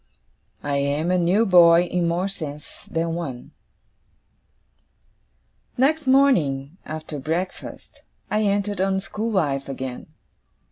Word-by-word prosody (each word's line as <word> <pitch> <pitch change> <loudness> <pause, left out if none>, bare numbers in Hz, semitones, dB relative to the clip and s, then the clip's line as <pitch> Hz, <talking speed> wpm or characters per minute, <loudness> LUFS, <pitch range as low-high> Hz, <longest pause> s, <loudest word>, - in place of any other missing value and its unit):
I 145 -1 -1
AM 145 +5 0
A 185 - +2
NEW 185 +6 +3
BOY 175 -3 +7
IN 175 -1 -1
MORE 175 +3 0
SENSES 150 -7 -8
THAN 165 0 -1
ONE 140 -8 -6 2.3
Next 290 +3 +2
morning, 175 - +2
after 155 -1 -6
breakfast, 165 +7 -5 0.3
I 215 - +2
entered 205 -1 0
on 190 0 +1
school 215 +3 -4
life 145 -10 0
again. 130 -2 -6
170 Hz, 110 wpm, -23 LUFS, 145-200 Hz, 2.3 s, BOY